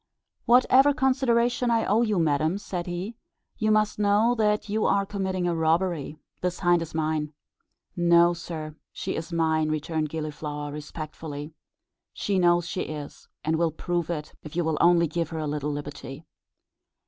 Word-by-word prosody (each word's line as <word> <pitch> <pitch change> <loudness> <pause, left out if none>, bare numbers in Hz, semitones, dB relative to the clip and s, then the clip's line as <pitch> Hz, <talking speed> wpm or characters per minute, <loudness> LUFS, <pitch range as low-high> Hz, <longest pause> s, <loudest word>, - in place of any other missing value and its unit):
"Whatever 260 +3 +5
consideration 245 -3 +2
I 230 -1 +2
owe 215 +3 +3
you, 215 -4 +1
madam," 155 +2 +1
said 180 -3 -5
he, 180 +6 -4 0.4
"you 215 -1 +1
must 215 -1 +2
know 210 +3 +3
that 210 -3 +1
you 215 +1 0
are 200 0 +2
committing 190 -3 -2
a 175 - +1
robbery; 160 -1 0 0.2
this 180 0 -2
hind 175 -2 +4
is 165 -1 -6
mine." 155 -1 -1 0.6
"No, 170 0 +5
sir, 160 -3 -6 0.2
she - - -4
is 165 +2 -5
mine," 160 -2 +1
returned 155 0 -1
Gilliflower, 150 -1 -5
respectfully. 150 0 -7 0.6
"She 195 -2 0
knows 175 -1 +3
she 185 - -3
is, 150 -2 -7 0.2
and 160 +1 +1
will 170 0 +2
prove 175 +1 -2
it 150 -3 -4
if 155 - -10
you 175 - +1
will 160 -1 -1
only 170 0 +5
give 165 0 -2
her 165 - -5
a 155 - -2
little 150 0 -2
liberty. 145 0 -7
170 Hz, 160 wpm, -26 LUFS, 155-200 Hz, 0.6 s, Whatever